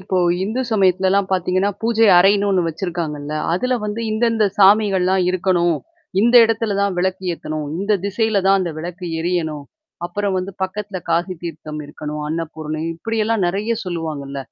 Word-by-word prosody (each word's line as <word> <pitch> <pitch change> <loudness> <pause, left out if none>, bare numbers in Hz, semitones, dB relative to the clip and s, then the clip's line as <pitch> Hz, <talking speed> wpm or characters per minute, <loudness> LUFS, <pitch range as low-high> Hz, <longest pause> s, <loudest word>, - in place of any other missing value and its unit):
இப்போ 185 0 -1 0.3
இந்து 220 +6 -2
சமயத்துலலாம் 190 -1 +2
பார்த்தீங்கன்னா, 185 +2 +1
பூஜை 225 -1 +3
அறைன்னு 200 +2 +4
ஒண்ணு 185 -2 +2
வச்சிருக்காங்கல்ல. 160 -4 -4 0.2
அதுல 250 +8 0
வந்து 210 +2 -3
இந்த 220 +2 +1
இந்த 215 -2 +3
சாமிகள்லாம் 190 -2 +4
இருக்கணும். 175 -3 +1 0.4
இந்த 235 +3 +3
இடத்துல 225 -2 0
தான் 200 -2 0
விளக்கு 190 +1 -1
ஏத்தணும். 155 -2 -5
இந்த 200 +2 0
திசையில 205 0 +1
தான் 195 0 +5
அந்த 175 -3 -2
விளக்கு 175 +2 -6
எரியணும். 160 -4 -2 0.4
அப்புறம் 200 +2 -2
வந்து 185 +2 -4
பக்கத்தில 195 0 -4
காசி 175 +3 0
தீர்த்தம் 155 -2 -6
இருக்கணும். 150 +1 -6
அன்னபூரணி 155 -1 -4
இப்படியெல்லாம் 225 0 0
நெறைய 205 +6 -1
சொல்லுவாங்கல்ல. 155 -6 -4
185 Hz, 145 wpm, -20 LUFS, 165-205 Hz, 0.4 s, தான்